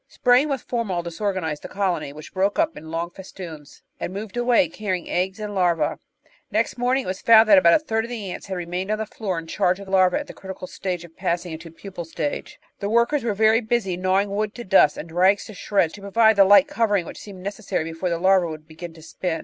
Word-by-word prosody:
Spraying 255 +3 +3
with 270 -3 -3
formol 205 -8 -2
disorganised 170 -3 -3
the - - -7
colony, 185 -7 -2
which 150 +1 -11
broke 195 +2 +1
up 325 0 +1
in 160 - -10
long 165 +1 -3
festoons, 170 -6 -10 0.2
and - - -4
moved 200 +2 -7
away, 240 -6 +3
carrying 185 0 -4
eggs 190 +3 -1
and 210 -1 -5
larvae. 175 -5 +1 0.5
Next - - 0
morning 250 +2 +1
it - - -9
was 185 +1 -4
found 225 -1 +7
that 200 -3 +8
about 170 -2 +6
a 310 - 0
third 225 -3 0
of - - -9
the 215 -6 -5
ants - - -8
had 190 -1 -4
remained 180 +2 -4
on 215 - +1
the 220 - -3
floor 200 -4 -4
in 165 - -5
charge 180 +3 0
of 200 - -10
larvae 185 -1 +3
at 295 - -4
the - - -10
critical 190 -1 -8
stage 180 -2 -4
of 165 -1 -17
passing 175 -1 -2
into 165 +1 -8
the 165 - -19
pupal 190 -1 -7
stage. 160 -2 -5 0.2
The 200 - -2
workers 235 +5 +2
were 225 -3 -1
very 220 +2 +4
busy 215 -5 0
gnawing 190 +2 +1
wood 210 +1 -2
to 240 - -7
dust, 190 -7 +4
and 165 - -7
rags 185 +4 +3
to 215 - -10
shreds, 185 -3 0
to 205 - -11
provide 220 +2 +4
the 195 - +7
light 205 +9 +7
covering 220 -10 +1
which - - -9
seemed 190 -3 -10
necessary 200 -4 -3
before 165 +3 -3
the 170 - 0
larvae 185 0 +3
would 155 -1 -8
begin 165 +1 -9
to 160 - -14
spin. 165 0 -3
190 Hz, 240 wpm, -23 LUFS, 170-215 Hz, 0.5 s, that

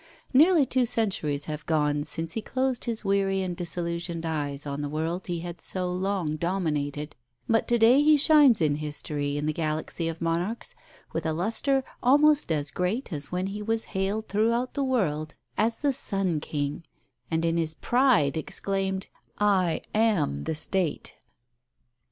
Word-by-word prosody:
Nearly 310 +2 +6
two 255 -1 +1
centuries 155 -11 0
have 150 -1 -5
gone 150 -2 +1
since 165 +1 -2
he 225 - -2
closed 260 +1 -1
his 230 -3 -4
weary 195 -1 +1
and 180 -1 -3
disillusioned 170 -1 -3
eyes 145 -3 -3
on 140 0 -3
the 145 - -3
world 165 +4 -3
he 175 -2 -2
had 175 0 -7
so 180 -1 -2
long 185 -4 -1
dominated; 150 -4 -2 0.3
but 225 0 +2
to 240 - +3
day 235 +5 +6
he 305 0 +6
shines 285 - +5
in 150 -2 +2
history 145 -1 -3
in 145 - -2
the 155 - 0
galaxy 160 +1 -2
of 165 0 -4
monarchs 170 +7 -2 0.4
with - - -2
a 160 - 0
lustre 230 - 0 0.2
almost 290 - +4
as 145 -2 -1
great 190 +5 -2
as 145 -1 -5
when 180 +1 -1
he 200 +2 -4
was 225 +1 0
hailed 200 +3 -1
throughout 230 +4 +1
the 280 - -1
world 155 - -1 0.2
as 225 +2 +1
the 285 -2 +1
"Sun 195 -9 0
King," 145 +1 -3 0.5
and 165 0 0
in 165 0 +1
his 160 -1 -1
pride 245 - +3
exclaimed, 190 +4 -2 0.3
"I 190 -5 +2
am 195 - +1
the - - -1
State." 175 +1 -2
180 Hz, 165 wpm, -27 LUFS, 155-225 Hz, 0.5 s, Nearly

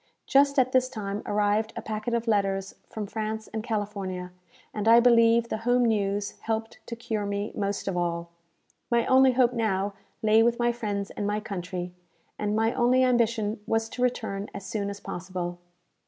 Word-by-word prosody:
Just 280 +1 +4
at 255 -1 +3
this 255 0 +3
time 210 -4 -4
arrived 210 +1 +1
a - - -4
packet 215 +2 -2
of 235 0 -2
letters 195 -2 0 0.2
from 215 -1 -4
France 220 +1 -4
and 220 - -2
California; 200 -5 -3 0.4
and 210 0 -2
I 230 +1 +8
believe 235 -1 +5
the - - -1
home 245 +2 +2
news 205 -2 0
helped 225 0 -3
to 235 - -5
cure 220 -3 -3
me 200 +1 -2
most 200 0 -2
of 195 - -1
all. 170 -1 -2 0.6
My 235 -1 +2
only 260 0 +5
hope 250 -1 +3
now 205 -4 0 0.3
lay 220 +1 +5
with 235 +1 +3
my 240 0 +2
friends 205 -4 -3
and 205 - -3
my 210 +1 0
country, 180 -3 -5 0.5
and 210 0 0
my 225 +1 +2
only 255 +1 +3
ambition 230 -4 +1
was 225 0 +1
to 250 - -6
return 220 -5 -1
as 200 -1 -7
soon 200 -1 -2
as 200 0 -6
possible. 180 -2 -5
215 Hz, 180 wpm, -27 LUFS, 200-235 Hz, 0.6 s, I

